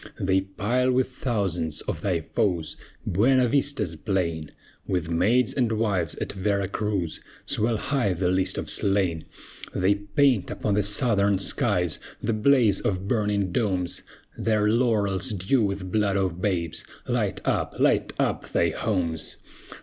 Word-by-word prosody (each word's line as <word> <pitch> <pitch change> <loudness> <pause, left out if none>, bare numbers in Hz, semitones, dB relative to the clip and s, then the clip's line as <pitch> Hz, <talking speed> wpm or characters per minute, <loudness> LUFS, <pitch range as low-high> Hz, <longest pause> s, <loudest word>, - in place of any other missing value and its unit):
They 95 0 +2
pile 115 +7 0
with 130 0 +1
thousands 90 - -2
of 80 - -4
thy 90 -4 0
foes 80 0 -1 0.3
Buena 125 +7 +3
Vista's 140 - 0
plain; 85 -4 -2 0.4
With 90 -3 -1
maids 115 +8 +2
and 120 -4 +1
wives, 100 -7 0
at - - -4
Vera 100 0 0
Cruz, 100 -7 -2 0.2
Swell 110 +1 +1
high 120 -4 0
the 90 +1 0
list 95 +1 +1
of - - -3
slain! 95 -5 +2 0.5
They 95 +2 +3
paint 105 +2 +1
upon 105 - -2
the 105 - +3
Southern 100 -1 +2
skies 95 - 0 0.2
The 115 - -1
blaze 110 -3 +3
of 95 -1 -2
burning 105 -4 0
domes, 90 -3 0 0.3
Their 105 -2 +1
laurels 110 -3 +1
dew 100 +7 +1
with 100 -3 -2
blood 100 -2 +1
of 90 -2 -1
babes! 85 -5 -1 0.2
Light - - 0
up, - - 0
light - - +2
up - - -1
thy 85 - +2
homes! 85 -4 -2
100 Hz, 140 wpm, -25 LUFS, 90-110 Hz, 0.5 s, Buena